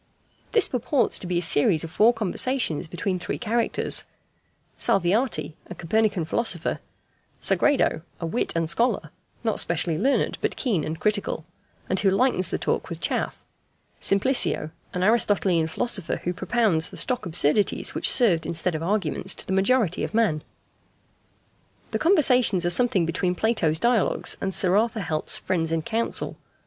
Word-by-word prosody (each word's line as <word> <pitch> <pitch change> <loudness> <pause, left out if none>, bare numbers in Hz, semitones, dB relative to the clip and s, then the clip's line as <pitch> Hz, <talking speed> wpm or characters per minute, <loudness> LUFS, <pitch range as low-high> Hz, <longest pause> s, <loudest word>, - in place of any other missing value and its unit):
This 445 - +5
purports 255 +2 0
to 180 - -7
be 180 -1 -1
a 175 - 0
series 160 +1 +3
of 165 - -7
four 220 +7 +4
conversations 225 - -1
between 180 +3 -3
three 175 - -4
characters: 235 0 +1 0.7
Salviati, 195 - +1
a 180 - -9
Copernican 200 0 0
philosopher; 175 -2 -2 0.6
Sagredo, 275 - +2 0.2
a 165 - -4
wit 165 +9 -1
and 165 -1 0
scholar, 195 -4 0 0.3
not 225 -2 +1
specially 165 -1 +1
learned, 275 +1 0
but - - -1
keen 210 - -1
and 160 +2 -5
critical, 200 -3 -1 0.4
and 190 - +1
who 200 - +2
lightens 195 -2 +1
the - - -2
talk - - -2
with - - -6
chaff; - - -3 0.6
Simplicio, 195 - +2 0.2
an 180 - -3
Aristotelian 190 -6 +2
philosopher, 195 +1 -2
who 175 - -2
propounds 190 -3 +1
the - - -11
stock 250 -6 0
absurdities 170 +4 +1
which - - +1
served 190 -10 +2
instead 170 +1 -2
of 155 - -4
arguments 190 0 -2
to - - -3
the 190 - -3
majority 195 -1 +1
of - - -4
men. 205 -10 +1 1.5
The - - -2
conversations 255 - +3
are 175 - +2
something 230 -4 +3
between 180 +2 -1
Plato's 175 -8 0
Dialogues 235 +3 +1
and 195 - -2
Sir 185 0 +2
Arthur 225 0 0
Helps's 155 -4 0
Friends 165 -3 -2
in 165 -1 -1
Council. 225 +6 -2
190 Hz, 155 wpm, -24 LUFS, 165-230 Hz, 1.5 s, This